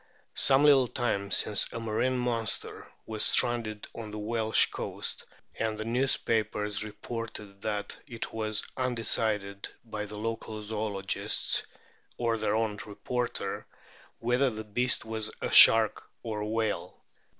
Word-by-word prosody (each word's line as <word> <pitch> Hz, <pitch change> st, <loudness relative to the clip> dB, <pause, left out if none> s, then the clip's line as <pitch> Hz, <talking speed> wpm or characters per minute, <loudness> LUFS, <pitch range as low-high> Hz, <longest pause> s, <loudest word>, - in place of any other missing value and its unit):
Some 135 Hz, 0 st, +4 dB
little 135 Hz, -4 st, +6 dB
time 100 Hz, -5 st, -2 dB
since 105 Hz, 0 st, +3 dB
a 115 Hz, -, -5 dB
marine 115 Hz, +3 st, 0 dB
monster 120 Hz, -3 st, -1 dB
was 110 Hz, -1 st, -2 dB
stranded 115 Hz, -3 st, +3 dB
on 115 Hz, -2 st, -7 dB
the 105 Hz, -, -7 dB
Welsh 110 Hz, +1 st, +2 dB
coast, -, -, -5 dB, 0.3 s
and 110 Hz, -1 st, -1 dB
the 110 Hz, -, -5 dB
newspapers 110 Hz, -4 st, 0 dB
reported 105 Hz, -2 st, -7 dB
that 105 Hz, -1 st, -3 dB
it 120 Hz, -4 st, -7 dB
was 110 Hz, -1 st, -1 dB
un 130 Hz, -1 st, -1 dB
decided 105 Hz, -3 st, -1 dB, 0.2 s
by 105 Hz, -2 st, -5 dB
the 105 Hz, 0 st, -8 dB
local 110 Hz, 0 st, -4 dB
zoologists, 105 Hz, -2 st, -1 dB, 0.5 s
or 115 Hz, -2 st, 0 dB
their 110 Hz, -1 st, 0 dB
own 110 Hz, -2 st, -1 dB
reporter, 120 Hz, +3 st, -4 dB, 0.5 s
whether 125 Hz, +3 st, +1 dB
the 110 Hz, -2 st, -6 dB
beast 125 Hz, +4 st, +1 dB
was 110 Hz, -1 st, -3 dB
a -, -, -3 dB
shark 110 Hz, -2 st, +7 dB
or 110 Hz, -3 st, -4 dB
a 105 Hz, -, -3 dB
whale. 110 Hz, -1 st, -3 dB
110 Hz, 135 wpm, -29 LUFS, 105-115 Hz, 0.5 s, shark